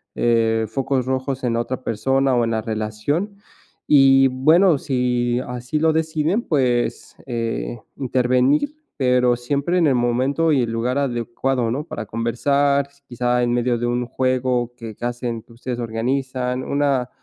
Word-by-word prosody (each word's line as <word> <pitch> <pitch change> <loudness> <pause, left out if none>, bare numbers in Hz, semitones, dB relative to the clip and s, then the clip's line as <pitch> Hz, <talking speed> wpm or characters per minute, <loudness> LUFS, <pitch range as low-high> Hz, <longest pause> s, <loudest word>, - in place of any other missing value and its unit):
eh, 115 -1 +2
focos 130 +2 -1
rojos 130 0 -2
en 120 - +1
la 115 - +1
otra 130 +2 -4
persona 135 +4 +1
o 120 - +2
en 115 - -1
la 110 -1 0
relación. 110 - -3 0.5
Y, 135 -2 +6
bueno, 155 +7 +4
si 125 -2 0
así 125 +4 -4
lo 160 +1 +3
deciden, 160 +5 0
pues, 125 -5 0
eh, 115 - -3 0.2
intervenir, 130 - +1 0.2
pero 125 -2 +3
siempre 140 +8 -1
en 165 -4 +4
el 135 - +3
momento 130 +7 +1
y 135 - +3
el 115 - -3
lugar 120 +4 -1
adecuado, 120 -1 -1
¿no? 145 +5 -2
Para 110 - -6
conversar, 140 +6 +1 0.2
quizá 125 0 0
en 120 - +1
medio 120 0 +1
de 120 - -2
un 120 0 -1
juego 125 -1 0
que 115 -3 -8
que 120 - -6
hacen 120 -1 -3
que - - -22
ustedes 120 +1 -5
organizan, 125 +2 -2
una 140 -3 0
125 Hz, 155 wpm, -21 LUFS, 120-135 Hz, 0.5 s, Y